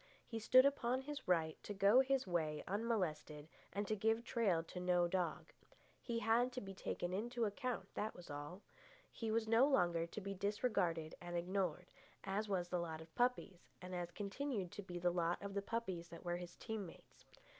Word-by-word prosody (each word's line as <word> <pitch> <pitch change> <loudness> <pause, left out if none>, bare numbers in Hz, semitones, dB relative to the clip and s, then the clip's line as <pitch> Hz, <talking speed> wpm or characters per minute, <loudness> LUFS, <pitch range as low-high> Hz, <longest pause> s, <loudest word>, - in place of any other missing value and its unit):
He 225 - -4
stood 255 +4 +7
upon 260 -2 +2
his 290 +1 -6
right 160 -3 +2
to 205 - -6
go 200 +5 +6
his 265 0 +3
way 160 -4 0
unmolested 180 -8 -1 0.2
and 205 0 -2
to 215 - +1
give 225 +3 +2
trail 200 -10 +2
to 180 - -7
no 180 -1 +3
dog. 175 -2 -2 0.5
He 235 -2 -2
had 230 +2 +3
to 255 - -2
be 195 -4 -7
taken 180 -1 -3
into 235 +4 0
account, 225 -1 -2
that 215 +1 -2
was 175 - -11
all. 145 +7 -6 0.5
He 225 - -3
was 220 0 +1
no 230 +5 +6
longer 175 - +3
to 170 - -6
be 200 -1 -4
disregarded 190 -5 0
and 175 0 -3
ignored, 180 -1 -1 0.3
as 205 +2 -1
was 180 -3 0
the 180 - 0
lot 160 -2 -3
of 160 0 -12
puppies, 240 -7 0
and 180 0 -7
as 175 -1 -2
continued 205 +1 -3
to 205 - -6
be 180 -3 -6
the 175 0 +2
lot 170 0 +1
of 200 0 -5
the 200 - 0
puppies 195 -6 -3
that 170 - -10
were 175 0 0
his 175 0 -8
team 220 -4 -4
mates. - - -15
195 Hz, 195 wpm, -39 LUFS, 175-225 Hz, 0.5 s, stood